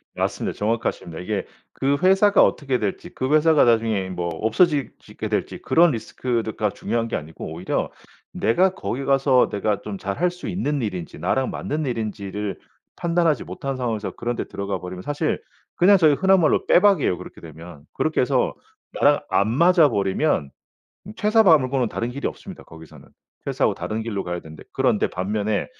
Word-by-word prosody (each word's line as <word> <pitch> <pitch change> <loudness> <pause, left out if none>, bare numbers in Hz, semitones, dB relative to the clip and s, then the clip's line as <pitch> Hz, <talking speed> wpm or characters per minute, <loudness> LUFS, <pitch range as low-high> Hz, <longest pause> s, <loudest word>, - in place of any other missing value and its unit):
맞습니다. - - -2
정확하십니다. 105 -6 -2
이게 100 +3 -3 0.3
그 140 +1 0
회사가 195 +2 +5
어떻게 135 -4 0
될지 105 -2 -3
그 130 +3 -1
회사가 155 -1 +5
나중에 110 -5 +1
뭐 90 -1 -3
없어지 135 - +1
지게 - - -7
될지 - - -2
그런 170 0 +4
리스크드가 115 -2 -2
중요한 115 +3 -2
게 115 - -3
아니고 80 +1 -7
오히려 85 +3 -2 0.4
내가 185 +11 +2
거기 120 - -4
가서 135 -2 +3
내가 105 0 -1
좀 105 -2 -6
잘할 100 - -1
수 180 0 -9
있는 150 -6 -1
일인지 95 -7 -5
나랑 135 -1 0
맞는 155 +1 -3
일인지를 105 -4 -4 0.4
판단하지 170 -3 +1
못한 135 -1 -5
상황에서 115 -5 -3
그런 120 +1 -4
데 - - -3
들어가 100 -1 -4
버리면 90 0 -7
사실 145 - -2 0.3
그냥 195 +3 +6
저희 155 -5 +5
흔한 190 +5 +4
말로 160 - +2
빼박이에요 180 - +4
그렇게 - - -11
되면. 80 -1 -12
그렇게 - - 0
해서 - - +1 0.4
나랑 - - +3
안 100 - +2
맞아 165 +5 +5
버리면 95 - 0 0.7
퇴사 220 +1 +4
바 170 -7 +7
말고는 130 -2 -1
다른 115 +3 -3
길이 140 +3 -3
없습니다 190 -3 -10
거기서는. 80 -1 -14 0.4
퇴사하고 - - +1
다른 110 +1 -4
길로 105 -4 -3
가야 90 0 -4
되는데 80 -1 -12
그런데 - - +2
반면에 105 +3 -2
120 Hz, 390 characters per minute, -22 LUFS, 100-155 Hz, 0.7 s, 바